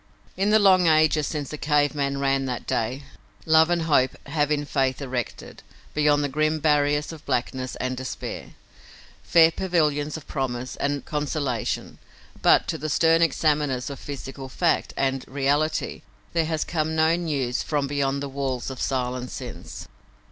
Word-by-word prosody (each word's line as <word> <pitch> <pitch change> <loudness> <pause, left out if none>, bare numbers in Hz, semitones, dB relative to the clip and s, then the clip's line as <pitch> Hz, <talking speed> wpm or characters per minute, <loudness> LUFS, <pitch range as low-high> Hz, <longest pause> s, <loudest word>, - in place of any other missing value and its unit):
In 195 +2 +1
the 215 - +6
long 190 -4 +5
ages 155 -1 +4
since 145 -3 -4
the 150 - -6
cave 145 -1 +2
man 140 -1 -1
ran 135 -1 +1
that 125 -2 -4
day, 125 +5 -2 0.4
love 160 +1 +5
and 175 -1 +1
hope 140 -5 +2
have 145 0 0
in 145 -1 0
faith 135 -2 0
erected, 125 -4 -5 0.3
beyond 150 -1 +3
the - - +1
grim 155 +3 +1
barriers 150 -1 +2
of 160 -2 -10
blackness 130 -1 -2
and 130 0 -2
despair, 130 0 -6 0.7
fair 165 -1 +5
pavilions 155 -5 0
of 155 - -11
promise 130 -1 -3
and 140 -1 -2
consolation, 145 -5 -2 0.4
but - - +5
to - - -3
the 155 +2 -3
stern 165 +2 +4
examiners 145 -5 +1
of 140 - -7
physical 135 -1 -7
fact 170 +5 +1
and 135 -1 0
reality 145 +3 0 0.3
there 165 -1 +2
has 160 -1 -1
come 160 -1 -2
no 160 +1 +4
news 145 -8 -1
from 145 -2 -1
beyond 140 0 -1
the - - -3
walls 135 -2 -3
of 130 - -7
silence 125 -1 -2
since. - - -8
145 Hz, 160 wpm, -24 LUFS, 135-155 Hz, 0.7 s, the